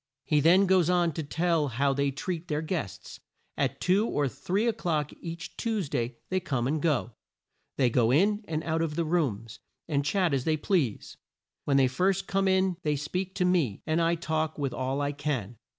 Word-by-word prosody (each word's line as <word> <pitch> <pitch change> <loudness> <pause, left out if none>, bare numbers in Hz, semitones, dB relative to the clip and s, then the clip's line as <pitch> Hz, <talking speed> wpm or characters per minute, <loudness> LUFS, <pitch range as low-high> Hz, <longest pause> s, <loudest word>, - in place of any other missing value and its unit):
He 150 - +3
then 175 +6 +5
goes 185 -3 +3
on 175 -2 +3
to 160 - -3
tell 160 +1 0
how 135 +3 +1
they 140 +1 +1
treat 170 +5 -4
their 150 -1 -1
guests. 155 - -5 0.4
"At - - -1
two 195 +5 +2
or 145 -1 0
three 180 - -1
o'clock 170 - -1
each 165 -1 -7
Tues 215 -9 -1
day 120 -3 -2
they 185 - +1
come 135 -9 -2
and 150 +2 -1
go. 130 - +1 0.7
They 125 -3 +3
go 115 -1 +3
in 205 - +3
and 155 -1 -2
out 160 0 -1
of 160 -2 -1
the 170 0 0
rooms 125 - -1 0.3
and 145 -3 0
chat 175 +2 +1
as 135 -2 +1
they 155 +1 +1
please. 145 - -1 0.5
When 140 -1 +3
they 135 - +5
first 185 +9 +1
come 195 0 0
in 190 -1 +2
they 150 -3 0
speak 180 +6 -3
to 180 - +1
me, 165 - +1
and 160 +2 +1
I 165 +1 +2
talk 160 -1 -2
with 140 -4 -2
all 130 +2 -2
I 145 0 0
can. 135 -7 -3
155 Hz, 200 wpm, -28 LUFS, 140-180 Hz, 0.7 s, then